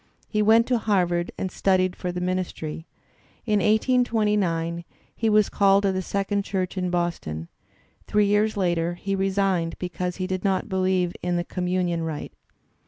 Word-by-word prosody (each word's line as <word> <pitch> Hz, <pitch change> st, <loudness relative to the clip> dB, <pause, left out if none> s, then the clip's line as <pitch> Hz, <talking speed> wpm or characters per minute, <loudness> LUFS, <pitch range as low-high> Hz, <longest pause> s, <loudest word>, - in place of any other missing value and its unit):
He 210 Hz, -, 0 dB
went 225 Hz, +2 st, +5 dB
to 245 Hz, -2 st, +1 dB
Harvard 180 Hz, -5 st, +1 dB
and 190 Hz, -, -3 dB
studied 185 Hz, -1 st, +1 dB
for 180 Hz, -, -4 dB
the 180 Hz, -, -4 dB
ministry. 180 Hz, -3 st, -3 dB, 0.6 s
In 210 Hz, -3 st, +2 dB
1829 210 Hz, -7 st, +1 dB, 0.3 s
he 225 Hz, -, 0 dB
was 210 Hz, -1 st, +4 dB
caUed 200 Hz, 0 st, +3 dB
to 195 Hz, -, +2 dB
the 185 Hz, 0 st, -1 dB
Second 200 Hz, +2 st, -1 dB
Church 190 Hz, -2 st, -3 dB
in 180 Hz, -1 st, -1 dB
Boston. 170 Hz, -, -2 dB, 0.6 s
Three 210 Hz, 0 st, +3 dB
years 205 Hz, +1 st, +2 dB
later 175 Hz, -2 st, 0 dB
he 195 Hz, +3 st, -3 dB
resigned, 190 Hz, -3 st, 0 dB
because 180 Hz, 0 st, -3 dB
he 185 Hz, -, -3 dB
did 185 Hz, 0 st, -3 dB
not 195 Hz, -2 st, 0 dB
believe 185 Hz, -2 st, +1 dB
in 175 Hz, 0 st, -1 dB
the 175 Hz, 0 st, -1 dB
conmiunion 180 Hz, -2 st, -1 dB
rite. 160 Hz, -2 st, -5 dB
185 Hz, 160 wpm, -24 LUFS, 175-205 Hz, 0.6 s, went